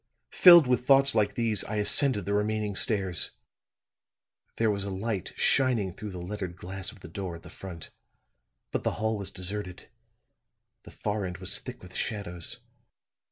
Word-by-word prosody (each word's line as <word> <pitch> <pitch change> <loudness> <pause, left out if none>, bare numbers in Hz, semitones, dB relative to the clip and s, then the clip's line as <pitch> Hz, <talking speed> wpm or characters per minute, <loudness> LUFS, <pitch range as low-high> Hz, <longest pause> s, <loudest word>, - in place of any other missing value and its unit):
"Filled 175 -4 +9
with 125 -1 +1
thoughts 135 0 +5
like 105 -2 +1
these, 115 -3 +1
I 105 - -4
ascended 105 +2 +3
the 100 - -2
remaining 105 0 -1
stairs. 95 -5 +1 1.2
There 115 -1 +2
was 100 -1 +2
a 100 - -4
light 100 0 -3
shining 120 -9 +2
through 105 - -7
the 95 - -8
lettered 90 0 -5
glass 95 +1 -5
of 100 - -17
the - - -10
door 90 +1 -6
at 85 - -13
the - - -12
front; 90 -4 -8 0.8
but - - -2
the - - 0
hall 110 +1 -1
was 100 -2 -4
deserted; 95 0 -2 1.0
the - - -11
far 105 0 -3
end 90 -2 -5
was - - -2
thick - - -10
with 90 0 -13
shadows. 90 -7 -2
100 Hz, 165 wpm, -28 LUFS, 95-110 Hz, 1.2 s, Filled